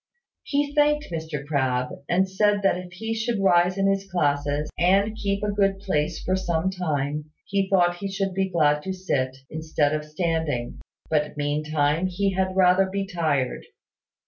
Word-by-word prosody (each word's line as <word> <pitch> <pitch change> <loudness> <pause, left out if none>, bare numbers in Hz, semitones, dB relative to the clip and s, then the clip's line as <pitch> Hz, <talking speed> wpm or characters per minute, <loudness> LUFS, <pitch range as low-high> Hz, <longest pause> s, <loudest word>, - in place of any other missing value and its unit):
He 285 0 -1
thanked 295 - +2
Mr 160 -4 -4
Crabbe, 130 -4 -1
and 190 +2 +3
said 205 +1 +1
that 195 - +4
if 180 0 -7
he 225 +5 -3
should 225 0 -1
rise 180 -1 +3
in 195 - +1
his 195 0 0
classes, 145 -3 0
and 195 +5 +3
keep 200 -2 -2
a 210 - 0
good 195 -1 +2
place 160 -5 -2
for 185 - +1
some 180 -1 0
time, 150 -5 -2 0.2
he 195 -1 0
thought 175 -2 +3
he 195 +2 -4
should 195 -1 -2
be 190 0 0
glad 150 -4 +2
to 190 +4 -4
sit, 135 -9 -2
instead 155 -2 0
of 155 0 -1
standing; 155 -5 -2 0.3
but 150 -1 0
meantime 150 +3 0
he 195 +2 0
had 185 0 -1
rather 190 0 +5
be 195 +1 -2
tired. 155 -9 -1
180 Hz, 170 wpm, -24 LUFS, 150-195 Hz, 0.3 s, rather